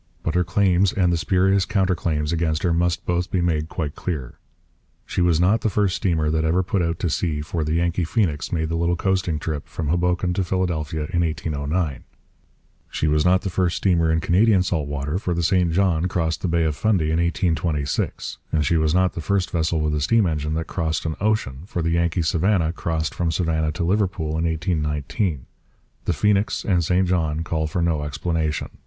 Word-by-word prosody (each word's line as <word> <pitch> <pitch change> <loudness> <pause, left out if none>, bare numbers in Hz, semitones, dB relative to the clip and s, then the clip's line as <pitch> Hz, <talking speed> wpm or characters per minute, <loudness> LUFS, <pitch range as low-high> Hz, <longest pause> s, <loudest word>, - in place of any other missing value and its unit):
But 80 - -1
her 90 0 +2
claims 95 +1 +2
and 90 -3 +2
the - - +1
spurious 95 +3 +2
counter 95 -1 +1
claims 80 -2 -1
against 80 -1 0
her 85 -2 +2
must 85 +1 0
both 90 0 -1
be 95 - 0
made 80 -3 0
quite 75 -6 -3
clear. 70 -9 -5 0.7
She - - -2
was 85 -2 +3
not 95 +6 +3
the 110 - +1
first 100 -2 +1
steamer 80 -6 0
that 80 0 0
ever 85 +4 +2
put 95 +1 0
out 85 -1 -1
to 85 - 0
sea, 75 -3 -1
for 80 +2 -3
the 75 +1 -1
Yankee 85 +1 +1
Phoenix 80 -5 -1
made 80 -2 -1
the 85 - -1
little 85 +1 +1
coasting 95 -3 0
trip 75 -1 -4
from 80 -3 -4
Hoboken 90 +1 +1
to 95 - 0
Philadelphia 85 -4 -2
in 85 - +2
1809. 80 -1 -2 0.9
She - - -2
was 75 0 +2
not 90 +2 +3
the 95 - -2
first 90 -1 0
steamer 85 -4 +2
in 80 0 +1
Canadian 95 +3 +3
salt 80 -6 -1
water, 70 +4 -2
for 90 -4 -2
the 85 - -1
St 90 -1 +2
John 90 -1 +2
crossed 80 -3 -1
the - - -1
Bay 85 -1 +1
of 80 -2 0
Fundy 90 -5 +1
in 80 - +1
1826. 80 -5 -1
And 75 -2 +1
she 85 +4 +2
was 80 +1 +1
not 95 0 +2
the 85 - -5
first 95 +3 0
vessel 80 -1 0
with 75 0 0
a 75 - -1
steam 110 +8 +3
engine 75 -2 -1
that 80 0 -2
crossed 80 -2 -2
an 80 -1 -2
ocean, 105 -11 0
for 85 -4 -3
the 85 - 0
Yankee 85 0 +1
Savannah 85 0 +1
crossed 80 -2 -2
from 85 -1 -1
Savannah 80 -1 0
to 85 - -3
Liverpool 90 -3 0
in 80 +1 0
1819. 80 - -1 0.6
The - - +1
Phoenix 105 0 +1
and 90 -4 +2
St 90 +3 +2
John 80 -3 0
call 80 -2 -1
for 85 +3 -1
no 80 -3 +1
explanation. 75 +2 -2
85 Hz, 205 wpm, -22 LUFS, 80-90 Hz, 0.9 s, was